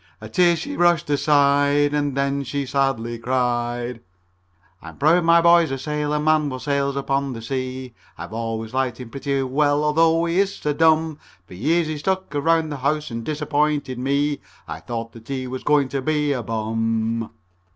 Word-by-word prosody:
A 110 - -9
tear 175 +9 +3
she 285 - -5
brushed 175 -3 +2
aside, 145 0 +3
And 145 -2 -1
then 140 0 0
she 140 +1 -3
sadly 125 -4 -1
cried: 120 -1 -1
CHORUS 90 -1 -39
"I'm 80 0 -11
proud 165 +4 +4
my 170 0 +5
boy's 170 -1 +5
a 135 - -2
sailor 150 +2 -2
man 155 -1 +2
what 130 -1 -6
sails 140 -1 0
upon 140 0 -1
the 115 - -7
sea. 130 0 -4 0.2
I've - - -8
always 115 0 -4
liked 130 -2 -1
him 125 -3 -9
pretty 140 0 -2
well 145 +2 +1
although 165 +2 +3
he 170 +2 0
is 200 0 +1
so 150 - -2
dumb. 160 0 +2 0.3
For - - -14
years 160 - +1
he's 155 -1 -4
stuck 190 +1 -2
around 160 +2 +1
the 145 - -4
house 150 +2 -1
and 115 0 -4
disappointed 150 -2 -1
me. 140 +2 0 0.3
I - - -6
thought 115 -1 -5
that 115 -1 -15
he 130 -2 -3
was 130 0 -5
going 145 -2 +3
to 135 0 -2
be 150 0 0
a 125 - -2
bum." 115 0 -2
140 Hz, 185 wpm, -22 LUFS, 120-150 Hz, 0.3 s, my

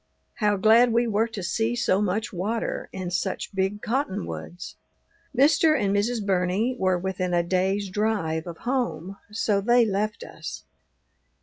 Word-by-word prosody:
How 210 -2 +2
glad 225 +4 +5
we 235 +1 +3
were 225 0 +1
to 215 -4 -6
see 225 +6 0
so 200 -4 +2
much 210 +2 -1
water 210 +6 -2
and 185 -2 -5
such 190 +3 -2
big 195 +2 -1
cottonwoods! 210 - -3 0.6
Mr. 305 +2 +5
and 200 -2 +1
Mrs. 215 +1 0
Burney 195 +6 +1
were 185 -1 +2
within 185 -1 -2
a 170 - +3
day's 190 +3 0
drive 190 -6 -1
of 170 -1 -7
home, 195 -8 -2
so 210 -1 +1
they 240 +3 +4
left 210 +1 -2
us. - - -8
205 Hz, 145 wpm, -25 LUFS, 185-225 Hz, 0.6 s, glad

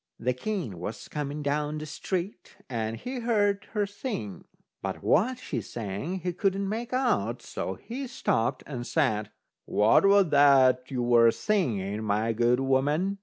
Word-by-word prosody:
The 125 +2 0
king 130 - -4
was 105 +5 -6
coming 150 0 -4
down 150 +1 -1
the 155 - -5
street, 180 +5 -4
and 115 -2 -3
he 255 - -5
heard 205 -4 +1
her 210 -2 +1
sing, 200 - -6 0.4
but - - -4
what 245 +10 +3
she 140 - -4
sang 115 - -5
he 180 +1 -2
couldn't 195 +1 0
make 225 +4 -3
out, 255 -1 0
so - - -4
he 260 +3 -6
stopped 130 - -1
and 125 -4 -6
said: 110 -9 +1 0.4
"What 130 - +4
was 200 -3 +5
that 135 -3 +5
you 125 -2 -2
were 120 -1 +6
singing, 110 - -1
my 110 +2 0
good 120 +2 +2
woman?" 145 +9 +1
145 Hz, 155 wpm, -27 LUFS, 120-200 Hz, 0.4 s, were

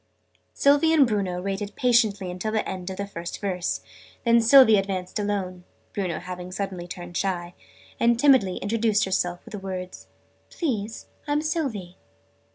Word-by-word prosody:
Sylvie 290 +3 +4
and 300 -4 +6
Bruno 195 -6 -1
waited 200 +1 -3
patiently 210 -7 +2
till 215 +4 -2
the 220 0 -1
end 185 -1 -5
of 190 - -6
the 200 - -2
first 175 -3 -7
verse. 180 -3 -2 0.4
Then 235 0 +5
Sylvie 230 -2 +7
advanced 195 0 -2
alone 190 -3 -2 0.3
(Bruno 180 -5 -2
having 180 0 -7
suddenly 185 -2 -4
turned 175 -1 -8
shy) 175 -2 -2 0.5
and 235 0 +3
timidly 255 -10 +4
introduced 215 0 +1
herself 175 -2 -1
with - - -12
the 205 - -5
words 185 -1 -7 0.4
"Please, 225 - -3 0.2
I'm 295 +1 +1
Sylvie!" 235 - -3
200 Hz, 150 wpm, -25 LUFS, 180-230 Hz, 0.5 s, Sylvie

